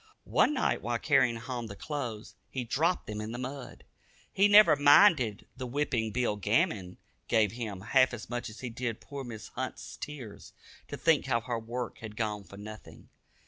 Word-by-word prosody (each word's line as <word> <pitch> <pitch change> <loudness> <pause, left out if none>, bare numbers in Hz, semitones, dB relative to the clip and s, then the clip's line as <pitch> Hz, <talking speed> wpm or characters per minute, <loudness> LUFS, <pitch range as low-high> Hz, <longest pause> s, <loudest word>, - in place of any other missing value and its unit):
One 300 - +3
night 260 - 0
while 120 0 -1
carrying 135 -2 +3
home 120 0 -5
the 100 - -8
clothes, 120 -6 -5 0.2
he 130 - -3
dropped 160 +9 0
them 105 0 -5
in 110 +2 -5
the - - -4
mud. 130 +1 -7 0.5
He 200 +2 +5
never 205 -5 +8
minded 145 - +5
the 130 -1 -5
whipping 120 -4 -1
Bill 115 -2 0
Gammon 105 - 0 0.3
gave 110 -3 +3
him 110 -5 -5
half 130 +6 +4
as 120 -3 -7
much 120 0 -4
as 110 - -11
he 125 -2 -5
did 115 -1 -3
poor 140 -1 -7
Mrs. 115 -4 -8
Hunt's - - -6
tears, 130 -8 -8 0.3
to - - -6
think 160 -5 +2
how 115 -3 +1
her 120 -1 -3
work 120 +1 -5
had 105 -2 -9
gone 105 -2 -2
for 100 - -13
nothing. 110 +1 -11
120 Hz, 185 wpm, -30 LUFS, 110-140 Hz, 0.5 s, never